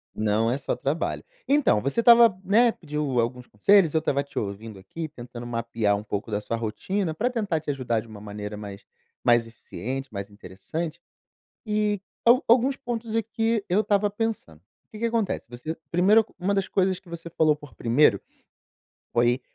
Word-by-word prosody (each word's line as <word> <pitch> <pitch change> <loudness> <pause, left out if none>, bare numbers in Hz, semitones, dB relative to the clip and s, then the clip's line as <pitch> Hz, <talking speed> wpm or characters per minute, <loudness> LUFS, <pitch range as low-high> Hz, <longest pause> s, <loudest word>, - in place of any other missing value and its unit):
Não 110 +1 +1
é 130 - 0
só 140 - -2
trabalho. 150 +5 -2 0.2
Então, 275 - +3
você 140 - -1
estava, 235 -3 +7
né, 230 +5 +4
pediu 150 - -2
alguns 125 +1 -2
conselhos, 170 - +4
eu 160 - +3
estava 140 -3 0
te 140 - -15
ouvindo 100 +1 -6
aqui, 155 - -6
tentando 120 -4 -9
mapear 115 -3 0
um 100 - -5
pouco 105 +1 -4
da 105 - -1
sua 115 +2 -3
rotina 160 - -2
pra 225 +11 0
tentar 205 -9 -1
te 155 - -8
ajudar 130 -5 0
de 115 - -15
uma 105 -2 -11
maneira 105 0 -6
mais 100 -1 -8 0.4
mais 120 -1 +4
eficiente, 130 +3 -6
mais 100 0 -5
interessante 105 - -6 0.7
e 210 -1 0 0.2
al 245 +4 +6
alguns 250 +4 +5
pontos 235 -4 -5
aqui, 225 0 0
eu 185 +4 +3
estava 205 -1 +2
pensando. 205 - -4 0.3
Que 215 - -10
que 230 - -3
acontece, 230 -4 -1
você 125 +7 -5 0.2
primeiro, 200 +6 +5
uma 190 +3 0
das 195 -1 0
coisas 190 -1 +1
que 185 - -21
você 170 0 -7
falou 155 -2 +3
por 145 -6 -14
primeiro, 115 -1 +3 0.9
foi 120 +2 +2
150 Hz, 175 wpm, -25 LUFS, -, 0.9 s, estava